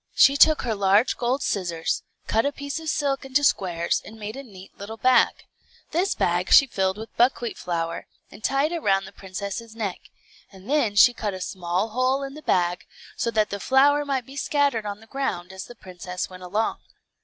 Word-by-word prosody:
She 275 - +6
took 310 +2 +5
her 235 -3 -1
large 200 +3 +3
gold 255 +3 -1
scissors, 170 -5 -1 0.2
cut 225 +1 +1
a 285 - 0
piece 285 +2 -5
of 320 -1 -5
silk 280 -3 0
into 270 +2 0
squares, 175 -9 +1
and 220 - -12
made 215 +1 -6
a 275 - -6
neat 195 -7 -14
little 215 +3 -8
bag. 255 +2 +3 0.5
This 360 +4 0
bag 175 +2 0
she 275 - +9
filled 190 -5 -1
with 220 +1 -9
buckwheat 240 -1 +2
flour, 165 -1 -4 0.2
and 210 - -14
tied 275 +4 +1
it 340 - -2
round 195 -4 +2
the 195 - -11
princess's 200 +4 -7
neck; 205 -5 -5 0.4
and 190 +1 -15
then 255 -7 +1
she 245 +4 +7
cut 210 -4 -3
a - - -7
small 180 +3 -2
hole 255 +4 0
in 275 0 -6
the 305 - -10
bag, 180 -9 0 0.3
so - - -1
that 215 -2 +1
the 200 - -3
flour 280 +6 +4
might 270 -4 -2
be 270 - -12
scattered 280 -6 0
on 205 +1 -6
the - - -15
ground 205 -8 -4
as 190 - -7
the 240 - -12
princess 180 -2 -6
went 185 0 -11
along. 205 +5 -1
220 Hz, 200 wpm, -24 LUFS, 190-270 Hz, 0.5 s, she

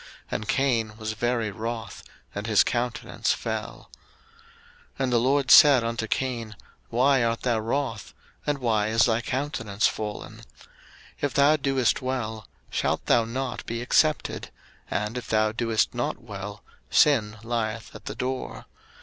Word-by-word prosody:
And 110 - -3
Cain 115 -6 +1
was 110 -1 -3
very 115 -1 -1
wroth, 110 0 -5 0.3
and 100 +2 -4
his 110 -3 +5
countenance 120 0 -1
fell. - - -5 1.0
01:004:006 - - -33
And 130 -2 0
the 120 - +5
LORD 130 +1 +2
said 140 -4 +9
unto 115 -1 -2
Cain, 115 -4 -2 0.3
Why 130 +2 +3
art 115 0 0
thou 120 -3 +1
wroth? 115 0 -3 0.3
and 145 -1 +1
why 110 -5 +1
is 115 +2 +4
thy 115 -1 +1
countenance 125 -5 -2
fallen? 105 -2 -3
01:004:007 115 - -14 0.8
If 145 -2 0
thou 140 +2 +5
doest 135 -4 +1
well, 120 -4 -3 0.2
shalt - - -1
thou 115 - +4
not 130 +3 -4
be 115 0 -3
accepted? 155 +5 +1 0.4
and 105 +4 -2
if - - -11
thou 110 0 +2
doest 115 -1 0
not 120 0 -2
well, 105 -2 -8 0.3
sin 110 -8 +3
lieth 115 -1 -3
at - - -12
the - - -5
door. 130 +1 -4
115 Hz, 150 wpm, -26 LUFS, 110-130 Hz, 1.0 s, said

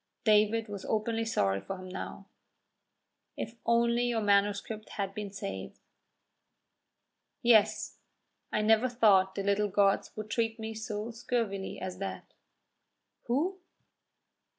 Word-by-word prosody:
David 215 +1 +3
was 205 -2 -6
openly 225 +1 0
sorry 100 - +1
for 195 - -6
him 185 0 -9
now. 190 +1 -7 1.1
"If 225 - -4
only 235 +1 +3
your 235 -2 0
manuscript 205 +1 +1
had 195 -1 -2
been 210 0 -5
saved!" 200 0 -6 1.7
"Yes; 215 -3 +3 0.5
I 215 - +1
never 225 +3 +4
thought 195 -6 +4
the 195 - -2
little 200 +1 +2
gods 195 0 +2
would 215 0 -6
treat 225 -1 0
me 220 0 -4
so 220 0 -4
scurvily 225 -4 -2
as 185 0 -5
that." 195 - -6 0.9
"Who?" 330 +11 0
215 Hz, 120 wpm, -30 LUFS, 200-225 Hz, 1.7 s, never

